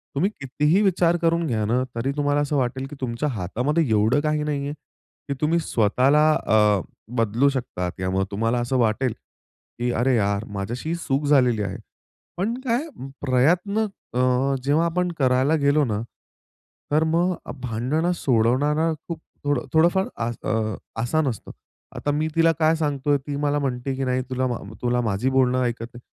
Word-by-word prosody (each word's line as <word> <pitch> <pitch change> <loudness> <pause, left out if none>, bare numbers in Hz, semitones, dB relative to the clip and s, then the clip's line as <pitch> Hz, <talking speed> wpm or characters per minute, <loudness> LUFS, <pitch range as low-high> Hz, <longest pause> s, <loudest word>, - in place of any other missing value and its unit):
तुम्ही 185 +9 +2
कितीही 150 +7 +1
विचार 175 -3 +3
करून 170 0 +1
घ्या 110 -4 0
ना, 125 +4 +1
तरी 130 +4 -1
तुम्हाला 145 0 +1
असं 145 0 -1
वाटेल 130 0 -1
की 145 - -9
तुमच्या 130 +4 -1
हातामध्ये 125 - -1
एवढं 110 +6 +3
काही 150 0 0
नाहीये 145 -1 -2 0.5
की 140 - -1
तुम्ही 165 +3 +2
स्वतःला 135 +5 +3
अ, 105 -3 +3 0.4
बदलू 115 +5 +3
शकता 115 -9 -3
किंवा 95 +1 -4
मग - - +2
तुम्हाला 115 +4 0
असं 125 +2 0
वाटेल 120 +1 +1 0.7
की 120 0 0
"अरे 125 +2 +2
यार! 100 0 0
माझ्याशी 105 +8 -5
ही 170 - 0
चुक 145 -3 -1
झालेली 125 -6 +4
आहे." 100 - -4 0.6
पण 205 +6 0
काय 250 +6 0 0.3
प्रयत्न 175 - +2 0.3
अ, 130 +2 +2
जेव्हा 150 +5 +2
आपण 180 +1 0
करायला 130 +4 +3
गेलो 145 +1 +3
ना, 105 -2 -2 0.9
तर 155 +2 +3
मग 170 +3 +1
अ, - - -6
भांडणं 130 +9 -1
सोडवणारा 145 +6 +2 0.2
खूप 165 -2 -5 0.3
थोडं 145 -4 0
थोडंफार 175 +4 +4 0.2
आस 120 0 -3
अ, 110 -1 -1 0.3
आसान 150 +6 +1
असतं. 115 -6 -4 0.4
आता 145 - -1
मी 150 +2 0
तिला 165 0 +5
काय 160 +1 +4
सांगतोय, 145 -2 0
ती 140 +1 -6
मला 145 0 0
म्हणते 135 -1 -2
की 135 - -2
"नाही 130 0 0
तुला 130 0 -1
म 110 -4 -5
तुला 125 0 +1
माझी 110 +3 0
बोलणं 130 -1 +2
ऐकत 120 -1 -2
नाही" 120 - -10
135 Hz, 170 wpm, -23 LUFS, 120-155 Hz, 0.9 s, तिला